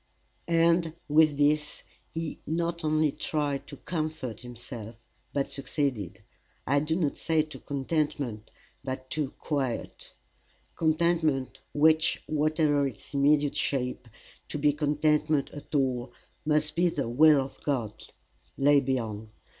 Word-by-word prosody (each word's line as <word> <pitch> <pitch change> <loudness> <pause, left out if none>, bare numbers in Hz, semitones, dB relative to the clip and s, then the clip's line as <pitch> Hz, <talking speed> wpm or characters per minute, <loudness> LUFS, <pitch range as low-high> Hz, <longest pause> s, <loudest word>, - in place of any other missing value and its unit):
And 165 -1 +3
with 150 -1 +4
this 150 +1 +1 0.3
he 165 -1 -4
not 170 +2 -1
only 155 -1 +2
tried 145 -2 -2
to - - -9
comfort 155 -8 -4
himself, 120 -2 -8 0.4
but 140 -1 -1
succeeded 120 - -2 0.4
I 140 +3 +3
do 155 +2 0
not 160 -5 0
say 160 -1 +2
to 155 0 -10
contentment, 140 -6 -2 0.3
but 130 -1 -5
to 150 -3 -1
quiet. 135 -6 -3 0.6
Contentment, 160 -4 +1
which, 155 +1 +3
whatever 150 -1 +2
its 130 +2 -10
immediate 145 +1 +3
shape, 125 -3 -1 0.4
to - - -4
be 145 0 +3
contentment 150 0 +1
at 145 +1 -8
all, 130 -3 0 0.3
must 150 0 +1
be 175 +1 +3
the 140 -6 -2
will 150 +5 +6
of 135 0 -5
God, 120 -8 -1 0.6
lay 145 +1 +5
beyond. 115 -5 -2
145 Hz, 120 wpm, -28 LUFS, 135-155 Hz, 0.6 s, will